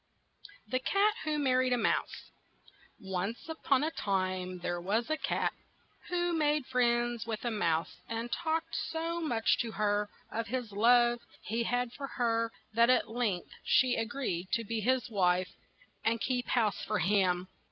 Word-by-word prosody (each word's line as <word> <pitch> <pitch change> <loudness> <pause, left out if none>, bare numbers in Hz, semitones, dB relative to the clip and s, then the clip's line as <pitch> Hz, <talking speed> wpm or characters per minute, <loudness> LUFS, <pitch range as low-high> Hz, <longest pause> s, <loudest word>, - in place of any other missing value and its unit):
THE 255 +4 0
CAT 400 +9 +3
WHO 305 -1 0
MARRIED 255 -3 +2
A - - +2
MOUSE - - -1 0.7
ONCE 195 - -4 0.2
on 275 0 +5
a 315 - 0
time 185 - -1
there 175 0 -3
was 220 - 0
a 310 - +1
cat - - 0 0.6
who 350 -1 0
made 300 -3 +2
friends 240 -2 +1
with 225 +1 -4
a 240 - 0
mouse, 170 -6 0
and 230 +1 -3
talked 320 0 -1
so 330 +1 -2
much 235 -8 +1
to 230 -2 -2
her 205 0 +1 0.2
of 230 +1 -2
the 255 +2 0
love 240 +3 +5 0.2
he 225 +2 -1
had 245 0 0
for 275 - -5
her 230 -2 +1 0.2
that 235 +2 +5
at 255 -3 +3
length 225 -7 -1
she 255 -2 +4
a 225 - 0
greed 225 -8 -3
to 230 - +2
be 225 +1 -2
his 255 +3 +1
wife 185 -4 +1 0.5
and 230 +1 +1
keep 250 +1 -1
house 220 -5 +1
for 215 - -1
him. 185 -1 +2
235 Hz, 165 wpm, -31 LUFS, 205-255 Hz, 0.7 s, on